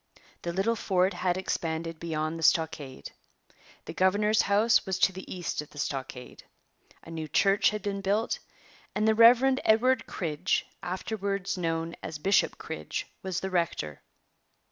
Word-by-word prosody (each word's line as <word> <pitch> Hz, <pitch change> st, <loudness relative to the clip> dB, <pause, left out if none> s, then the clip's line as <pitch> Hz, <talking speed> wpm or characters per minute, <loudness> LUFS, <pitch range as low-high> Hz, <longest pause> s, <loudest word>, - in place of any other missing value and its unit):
The 170 Hz, -, -3 dB
little 195 Hz, +6 st, +1 dB
fort 190 Hz, -3 st, +1 dB
had 175 Hz, 0 st, 0 dB
expanded 165 Hz, -3 st, -3 dB
beyond 160 Hz, -1 st, -3 dB
the -, -, -5 dB
stockade. 150 Hz, -, 0 dB, 0.7 s
The -, -, -6 dB
governor's 210 Hz, +3 st, +3 dB
house 210 Hz, +3 st, +3 dB
was 190 Hz, -2 st, -2 dB
to 190 Hz, -, +3 dB
the 190 Hz, +1 st, -9 dB
east 175 Hz, -4 st, -3 dB
of 150 Hz, -, -12 dB
the -, -, -16 dB
stockade. 135 Hz, -3 st, -5 dB, 0.6 s
A 165 Hz, -, -11 dB
new 160 Hz, -1 st, -5 dB
church 195 Hz, +7 st, +3 dB
had 210 Hz, 0 st, -5 dB
been 200 Hz, -1 st, -2 dB
built, 205 Hz, +4 st, 0 dB, 0.6 s
and 215 Hz, +1 st, +1 dB
the 220 Hz, -, +5 dB
Rev. 245 Hz, +4 st, +6 dB
Edward 240 Hz, +3 st, +3 dB
Cridge, 155 Hz, -5 st, -1 dB, 0.2 s
afterwards 195 Hz, +2 st, -3 dB
known 165 Hz, -1 st, -2 dB
as 155 Hz, -, -6 dB
Bishop 190 Hz, +6 st, +2 dB
Cridge, 75 Hz, -1 st, -5 dB, 0.2 s
was 190 Hz, -2 st, -3 dB
the 190 Hz, -, -4 dB
rector. 165 Hz, -, -1 dB
185 Hz, 150 wpm, -28 LUFS, 165-205 Hz, 0.7 s, Rev